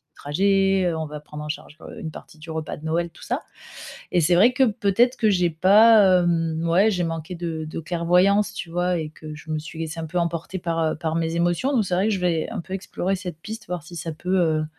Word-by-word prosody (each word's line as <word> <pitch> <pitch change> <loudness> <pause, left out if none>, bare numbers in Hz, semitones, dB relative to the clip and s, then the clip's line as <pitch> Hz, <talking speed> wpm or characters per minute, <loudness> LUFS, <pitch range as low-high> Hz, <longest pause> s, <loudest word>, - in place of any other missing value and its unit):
trajet, 195 +4 +2
heu, 170 - 0
on 160 - -3
va 150 0 -7
prendre 150 0 -9
en 150 - -7
charge, 150 - -6
heu, - - -10
une 160 - -5
partie 155 - -12
du 160 +1 -11
repas 160 -1 -4
de 155 - -11
Noël 170 +2 0
tout 165 - -19
ça, - - -2 0.7
et 175 - +2
c'est 170 +2 +3
vrai 210 +8 +6
que 265 +2 +3
peut-être 235 +2 +2
que 220 -2 +2
j'ai 180 -3 +2
pas, 195 +2 +6
hem, 165 -1 0
ouais, 195 +6 +4
j'ai 180 -4 0
manqué 165 +1 -4
de 165 -2 -4
de 155 +1 -6
clairvoyance, 180 +5 +2
tu 170 - -6
vois, 175 +1 0
et 155 -1 -4
que 155 -1 -10
je 155 +1 -11
me 155 - 0
suis 160 +1 -10
laissée 165 0 -4
un 160 - -4
peu 175 +3 -2
emporter 170 +2 -2
par, 165 -2 -2
heu, 160 -1 0
par 160 0 -3
mes 165 0 -1
émotions, 175 +11 +1
donc 235 -6 +2
c'est 180 - -1
vrai 190 +4 +2
que 220 - +1
je 190 - -2
vais 170 -3 0
un - - -4
peu 185 - -11
explorer 190 0 -2
cette 180 -4 -7
piste, 220 +5 -8
voir 180 -2 -4
si 175 - -12
ça 165 0 -4
peut, 180 +4 -2
heu, 160 -3 +2
170 Hz, 255 wpm, -23 LUFS, 160-190 Hz, 0.7 s, vrai